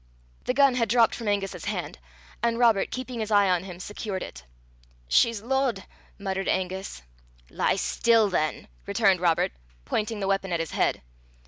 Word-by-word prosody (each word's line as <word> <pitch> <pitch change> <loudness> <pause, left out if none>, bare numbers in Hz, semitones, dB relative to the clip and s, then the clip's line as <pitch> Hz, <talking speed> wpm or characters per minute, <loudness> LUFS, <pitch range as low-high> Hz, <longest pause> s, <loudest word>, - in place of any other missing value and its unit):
The 250 - 0
gun 275 -2 +5
had 230 -3 0
dropped 230 0 +4
from 230 - -5
Angus's 200 -2 -1
hand, - - -4 0.4
and 230 0 +1
Robert, 230 -5 +3
keeping 255 -1 -5
his 215 -1 -3
eye 205 -2 +4
on 180 0 +1
him, 180 -2 -9
secured 200 0 -5
it. - - -9 0.6
"She's 215 - +3
lodd," 255 -5 0 0.3
muttered 195 -1 -3
Angus. 190 - -2 0.5
"Lie - - +1
still 230 -2 +3
than," 155 -5 -1 0.2
returned 200 -2 +3
Robert, 170 -2 +2 0.3
pointing 215 - -2
the 195 - -2
weapon 195 -1 0
at 170 - 0
his 165 -1 -3
head. - - 0
200 Hz, 160 wpm, -26 LUFS, 190-230 Hz, 0.6 s, gun